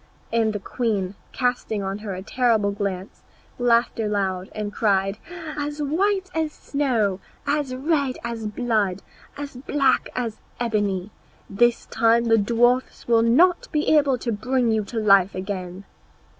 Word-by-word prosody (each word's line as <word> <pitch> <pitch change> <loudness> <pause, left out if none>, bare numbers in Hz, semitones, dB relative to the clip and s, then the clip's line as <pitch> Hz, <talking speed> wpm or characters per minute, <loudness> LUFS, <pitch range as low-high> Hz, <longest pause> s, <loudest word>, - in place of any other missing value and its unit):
And 225 -1 +2
the 210 - -3
queen, 200 -3 -2 0.2
casting 245 -5 -1
on 195 +1 -3
her 205 -3 -5
a 185 - -7
terrible 225 -3 +2
glance, 200 -2 -4 0.4
laughed 235 -1 +2
aloud 195 -4 -1
and 210 -1 -4
cried, 195 -1 +1 0.4
"As 295 0 -4
white 380 +6 0
as 320 -1 -1
snow, 235 -12 0 0.3
as 285 -3 0
red 280 -1 0
as 230 -2 -4
blood, 210 -4 0 0.3
as 285 -2 -6
black 275 0 +1
as 235 -3 -3 0.2
ebony! 205 -4 -1 0.4
this 240 +4 +2
time 230 +1 +3
the 225 -1 +4
dwarfs 240 +4 +1
will 230 -1 +4
not 335 +11 +4
be 305 0 +2
able 280 -4 +3
to 240 0 -3
bring 250 +2 +1
you 220 -1 +1
to 230 - -7
life 195 -3 +4
again." 185 -1 -5
230 Hz, 145 wpm, -23 LUFS, 200-260 Hz, 0.4 s, the